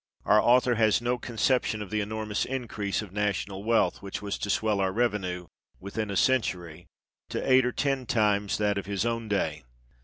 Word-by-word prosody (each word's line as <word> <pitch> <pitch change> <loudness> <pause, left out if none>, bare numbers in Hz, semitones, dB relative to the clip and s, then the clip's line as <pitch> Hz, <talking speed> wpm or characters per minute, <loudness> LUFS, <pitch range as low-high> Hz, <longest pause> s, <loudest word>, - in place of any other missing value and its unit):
Our 105 0 +5
author 125 0 +4
has 110 -2 +3
no 120 +1 -1
conception 120 -1 0
of 100 - -12
the 105 0 0
enormous 105 0 -2
increase 115 -6 -3
of 100 -3 -12
national 100 -1 -2
wealth 115 +1 +2
which 100 -1 -5
was 100 -1 -4
to 105 - -3
swell 105 0 +1
our 95 -1 +1
revenue, 95 -5 -1 0.3
within 105 +2 -4
a 100 - -2
century, 90 -9 0 0.4
to - - -2
eight 130 -1 +6
or - - 0
ten 135 -3 -1
times 105 -2 +1
that 105 -1 +1
of 100 - -8
his 100 +1 -1
own 115 -1 -2
day. 80 -7 -1
105 Hz, 185 wpm, -27 LUFS, 100-115 Hz, 0.4 s, eight